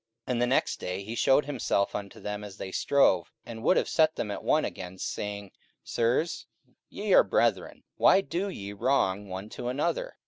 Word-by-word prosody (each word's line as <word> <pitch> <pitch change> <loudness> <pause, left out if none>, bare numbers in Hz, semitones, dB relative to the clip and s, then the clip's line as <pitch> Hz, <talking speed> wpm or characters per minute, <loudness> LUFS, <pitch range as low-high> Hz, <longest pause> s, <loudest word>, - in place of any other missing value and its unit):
44:007:026 - - -3
And 120 - -1
the 120 - +3
next 130 - +1
day 90 +2 -4
he 110 +3 -6
shewed 135 +4 +3
himself 125 -8 0
unto 100 -1 -6
them 105 0 -5
as 100 -2 -9
they 95 - -6
strove, 95 -8 +2
and 115 -1 -8
would 185 - +4
have - - +1
set 160 -1 +3
them 105 - -3
at - - -5
one - - +2
again, 90 0 -7
saying, 100 +1 -5 0.3
Sirs, 125 +8 0 0.4
ye - - -1
are - - +8
brethren; - - 0
why 195 - +6
do 195 +1 -3
ye 100 - -7
wrong 105 -4 +1
one 95 +2 -6
to 120 - -6
another? 475 - -2
110 Hz, 195 wpm, -28 LUFS, 100-140 Hz, 0.4 s, are